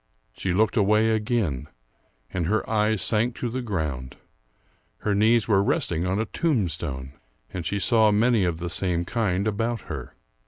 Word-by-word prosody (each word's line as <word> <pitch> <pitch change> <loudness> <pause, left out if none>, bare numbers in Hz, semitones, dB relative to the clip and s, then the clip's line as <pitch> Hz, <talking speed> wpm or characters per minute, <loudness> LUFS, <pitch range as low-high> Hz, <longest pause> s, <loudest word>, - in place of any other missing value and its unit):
She 95 - -3
looked 110 +6 +2
away 110 +2 +4
again, 105 - -1 0.6
and 85 -3 -1
her 110 +4 0
eyes 110 -2 +1
sank 115 +2 +1
to 120 - -3
the 130 +3 -3
ground. 75 - -3 0.8
Her 105 - 0
knees 110 +1 +3
were 100 -3 +4
resting 85 -3 0
on 95 +2 0
a 110 - 0
tombstone, 85 - -2 0.4
and 90 -3 -3
she 100 - -1
saw 110 +1 +4
many 110 0 +3
of 85 -3 0
the 85 0 -4
same 90 -2 0
kind 100 -2 0
about 115 +1 -1
her. 70 -5 -7
105 Hz, 160 wpm, -25 LUFS, 85-110 Hz, 0.8 s, away